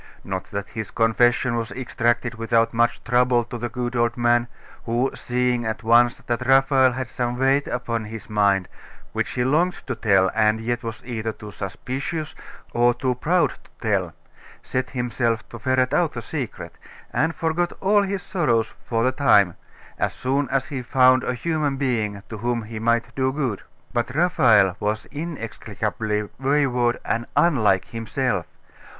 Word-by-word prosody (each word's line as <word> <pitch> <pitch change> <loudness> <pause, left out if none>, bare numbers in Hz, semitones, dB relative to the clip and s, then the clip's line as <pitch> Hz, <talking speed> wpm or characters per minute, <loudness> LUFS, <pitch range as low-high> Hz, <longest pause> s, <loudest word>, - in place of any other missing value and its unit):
Not 95 -1 -4
that 100 0 -5
his 110 -2 -5
confession 120 +2 +2
was 115 -1 -3
extracted 120 -1 0
without 115 0 +1
much 120 +1 +1
trouble 125 0 +3
to 120 +1 -7
the 120 +1 -3
good 120 +1 -3
old 120 0 +1
man, 120 0 +3 0.4
who, 120 +3 +1
seeing 125 -1 0
at 110 0 -3
once 120 +1 +4
that 120 +1 -2
Raphael 135 -1 +5
had 130 0 -3
some 120 0 -2
weight 135 +2 +2
upon 115 -2 -2
his 110 +1 -8
mind, 100 -3 +2 0.5
which - - -1
he 125 - -1
longed 160 +8 +2
to 130 - -2
tell, 100 -5 +3
and 110 0 +3
yet 120 +1 -2
was 115 -2 -6
either 110 -2 -3
too 105 -1 -10
suspicious 135 - -4 0.4
or 120 0 +3
too 130 -1 0
proud 170 +8 +2
to - - -23
tell, 95 -7 0 0.5
set 130 0 -2
himself 120 -3 -1
to 115 - -9
ferret 130 +2 +1
out 170 -3 +2
the 120 - -5
secret, 130 -1 -6 0.3
and 160 +1 +1
forgot 165 +2 0
all 205 +2 +4
his 195 -2 -2
sorrows 120 - 0
for 115 -1 0
the 130 - +3
time, 105 -10 +4 0.4
as - - 0
soon 135 +2 -1
as 135 0 0
he 135 -3 -3
found 130 +1 +4
a 125 - -1
human 150 0 -1
being 110 -7 -1
to 110 - -7
whom 120 +1 -1
he 110 0 -7
might 115 +1 +1
do 130 -1 +1
good. 130 -8 -2 0.3
But 120 +1 -1
Raphael 115 - +4
was 105 +1 -1
inexplicably 110 - -3
wayward 130 -3 +1
and 115 +1 -1
unlike 110 - +3
himself. 115 -1 -2
120 Hz, 165 wpm, -23 LUFS, 110-130 Hz, 0.5 s, Raphael